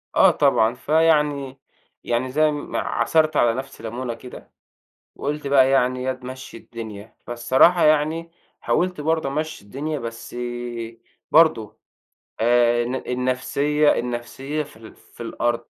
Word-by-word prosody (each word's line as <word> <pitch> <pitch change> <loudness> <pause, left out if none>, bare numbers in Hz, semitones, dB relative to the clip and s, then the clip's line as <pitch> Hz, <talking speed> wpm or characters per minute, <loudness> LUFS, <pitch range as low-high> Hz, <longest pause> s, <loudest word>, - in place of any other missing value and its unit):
آه - - +6
طبعًا، 110 +1 +3
فيعني 150 -2 +1 0.4
يعني، 120 +2 -1
زي 155 +2 +3
ما 145 -1 -4
عصَرت 155 -2 +1
على 115 -1 +4
نفسي 130 +3 -7
لَمُونة 120 +2 -4
كده، 125 +2 -12 0.6
وقُلت 150 +1 -4
بقى 135 -1 +5
يعني: 130 -1 +2
"ياض، 130 0 -3
مشِّي 130 0 -8
الدنيا." 110 -2 -9
فالصراحة 130 +9 +4
يعني، 155 +2 +2 0.3
حاوَلت 180 -2 0
برضو 160 -1 0
أمشِّي 155 -4 -4
الدنيا، 145 +8 -4
بس 115 -1 -8 0.9
برضو 155 -9 +3 0.6
آآ، 120 +1 +3
الن 125 +2 -3
النفسيَّة 130 +4 0
النفسيَّة 125 +5 -4
في 150 - -16
ال 110 -1 -13
في - - -13
الأرض. 120 +1 -2
130 Hz, 125 wpm, -22 LUFS, 120-150 Hz, 0.9 s, آه